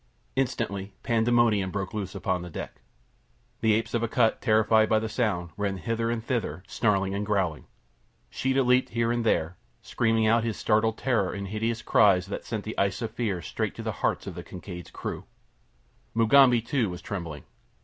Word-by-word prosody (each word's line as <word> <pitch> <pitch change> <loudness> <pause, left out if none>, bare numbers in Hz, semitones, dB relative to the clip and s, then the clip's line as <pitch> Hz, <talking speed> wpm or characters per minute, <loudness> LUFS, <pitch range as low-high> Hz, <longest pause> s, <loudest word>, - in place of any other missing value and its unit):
Instantly 105 -7 -2
pandemonium 115 -4 +2
broke 95 +2 -4
loose 100 -3 -4
upon 95 -3 -1
the 90 - -7
deck. - - -7 0.8
The 110 -2 +3
apes 115 +1 -2
of 120 - +1
Akut, 115 0 +1
terrified 110 0 +4
by 110 - +4
the 110 +1 -1
sound, 105 -7 -1
ran 100 -2 -1
hither 115 +5 -1
and 115 -1 -2
thither, 115 -7 -2
snarling 100 -3 +1
and 100 +1 -2
growling. 95 -7 -1 0.6
Sheeta 130 +1 +1
leaped 125 +1 +3
here 115 0 0
and 120 0 0
there, 85 -6 +1 0.3
screaming 115 -1 +1
out 115 +1 +3
his 115 -2 -2
startled 110 0 +2
terror 115 -8 0
in 100 0 -4
hideous 110 +3 -2
cries 95 -4 +4
that - - -5
sent 110 -3 -4
the 110 - -5
ice 100 +4 0
of 110 - -3
fear 110 -7 -2
straight - - -3
to - - -7
the - - -1
hearts - - 0
of - - -5
the - - -7
Kincaid's 90 -1 -9
crew. - - -6 0.9
Mugambi, 120 +1 +5
too, 115 -3 0
was 90 0 -7
trembling. 85 -8 -5
110 Hz, 180 wpm, -27 LUFS, 95-115 Hz, 0.9 s, Mugambi